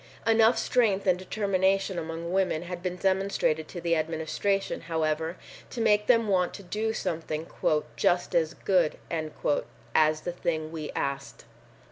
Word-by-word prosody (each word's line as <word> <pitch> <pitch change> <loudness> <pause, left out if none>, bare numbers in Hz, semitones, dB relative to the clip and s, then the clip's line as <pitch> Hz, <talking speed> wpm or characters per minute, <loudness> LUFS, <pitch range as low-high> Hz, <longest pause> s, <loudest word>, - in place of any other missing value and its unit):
Enough 225 +1 +5
strength 215 -6 +2
and 180 -2 +3
determination 190 -1 0
among 165 +1 -5
women 185 -4 +1
had 175 0 -6
been 180 0 -2
demonstrated 190 -4 0
to 175 - -7
the 170 0 +1
Administration, 160 +5 -1
however, 160 +1 -1 0.3
to 245 - -6
make 210 -2 +3
them 230 -3 +4
want 185 -3 +1
to 200 - -9
do 215 +4 -1
something 160 -6 -3 0.5
"just 175 0 +1
as 165 -1 +1
good" 180 -5 +1 1.0
as 155 0 +3
the 175 - -3
thing 160 -2 -2
we 155 -2 -5
asked. 140 0 -3
175 Hz, 140 wpm, -28 LUFS, 160-195 Hz, 1.0 s, Enough